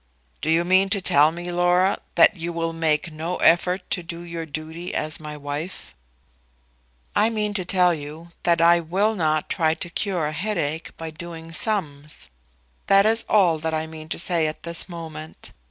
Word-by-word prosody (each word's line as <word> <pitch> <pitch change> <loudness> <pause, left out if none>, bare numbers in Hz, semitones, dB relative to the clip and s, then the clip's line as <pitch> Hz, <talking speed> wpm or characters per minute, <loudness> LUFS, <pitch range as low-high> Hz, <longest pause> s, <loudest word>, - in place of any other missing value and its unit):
"Do 155 - -2
you 165 +2 +3
mean 190 +2 +4
to 200 0 +1
tell 150 -4 +4
me, 175 +1 -6
Laura, 175 +2 +2 0.2
that 220 - +6
you 170 -1 -4
will 165 0 -2
make 160 0 0
no 160 +3 -4
effort 180 +2 +3
to 180 - 0
do 170 0 -7
your 170 -1 -6
duty 160 +3 -6
as 155 0 -2
my 150 -1 -7
wife?" 145 +5 -6 1.2
"I 215 +2 +4
mean 210 -2 -1
to 195 -2 -2
tell 180 -1 +3
you 155 +2 -8
that 170 -1 +2
I 170 +1 +6
will 190 +7 +1
not 155 -6 0
try 160 -2 +1
to 170 +1 -6
cure 180 -4 -1
a 150 - -1
headache 160 -3 -2
by 165 -1 -6
doing 165 0 -9
sums. 150 - -2 0.6
That 195 0 +6
is 225 +1 +3
all 180 -7 +4
that 160 +1 -2
I 155 0 -1
mean 160 0 -10
to - - -2
say 170 -2 +1
at 155 - -6
this 170 +2 0
moment. 160 -2 -8
170 Hz, 185 wpm, -23 LUFS, 155-180 Hz, 1.2 s, that